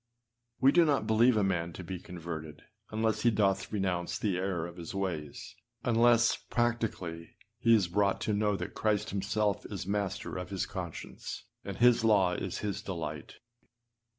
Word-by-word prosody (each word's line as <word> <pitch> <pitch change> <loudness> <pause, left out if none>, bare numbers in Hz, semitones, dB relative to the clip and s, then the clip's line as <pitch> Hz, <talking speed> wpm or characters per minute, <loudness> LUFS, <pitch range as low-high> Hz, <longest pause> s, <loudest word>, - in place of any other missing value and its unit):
We 135 - +6
do 170 +3 +6
not 145 -4 +2
believe 115 +2 +4
a 105 - +3
man 85 -3 0
to 95 - -7
be 90 +1 -5
converted 80 -4 -7 0.3
unless 110 0 0
he 120 - +5
doth 100 -3 +1
renounce 95 -4 -1
the 100 -4 0
error 90 -3 -1
of 85 0 -9
his 85 +2 -7
ways; 85 -7 -4 0.3
unless, 120 0 +4
practically, 115 -9 -2 0.2
he 115 0 +5
is 100 -5 +2
brought 100 +2 +1
to 105 - 0
know 105 0 +2
that 90 0 -5
Christ 105 -1 0
himself 100 +1 0
is 100 -4 -5
master 100 -2 -2
of 90 - -5
his 95 -2 -2
conscience, 90 -5 -6 0.2
and 100 -1 -6
his 120 -1 +5
law 100 -5 +4
is 90 +1 -3
his 100 0 -2
delight. 80 -7 -5
100 Hz, 165 wpm, -31 LUFS, 90-110 Hz, 0.3 s, We